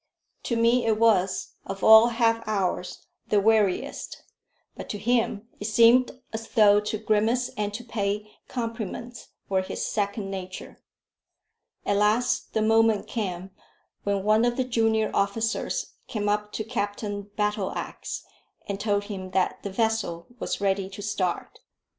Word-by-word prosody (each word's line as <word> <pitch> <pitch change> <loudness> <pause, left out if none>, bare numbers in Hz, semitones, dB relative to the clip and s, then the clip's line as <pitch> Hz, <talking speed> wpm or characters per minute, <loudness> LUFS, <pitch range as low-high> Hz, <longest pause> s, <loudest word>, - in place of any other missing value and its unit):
To 235 - 0
me 230 +1 +3
it 220 -1 +3
was 205 -5 +2
of 195 0 -6
all 220 +1 +9
half 230 -1 +2
hours 190 -3 -2 0.2
the 210 - +3
weariest, 210 -2 +1 0.5
but - - -8
to 210 - -3
him 225 0 0
it 205 - -5
seemed 235 +4 +4
as 225 0 -5
though 205 -3 +5
to 210 +1 -3
grimace 220 +4 +1
and 210 -1 -2
to 240 - -6
pay 210 -2 -2 0.2
compliments 230 0 -5 0.2
were 190 -1 +1
his 185 - -4
second 200 -1 -2
nature. 185 -1 -7 1.0
At 200 - +1
last 215 +4 +1
the 220 - +1
moment 225 -1 +3
came 190 -4 -4 0.5
when 200 -1 0
one 215 +2 +4
of 240 0 +1
the 260 - +2
junior 225 -3 +1
officers 220 - -1
came 210 -2 -2
up 210 0 0
to 220 - -2
Captain 205 -2 -3
Battleax 210 -2 -3 0.4
and 200 -1 -3
told 205 -1 +1
him 195 -3 -6
that 185 - -1
the 200 - -4
vessel 220 -5 -1
was - - -2
ready 195 -1 0
to 200 +1 -8
start. 185 -4 -2
210 Hz, 145 wpm, -26 LUFS, 200-225 Hz, 1.0 s, all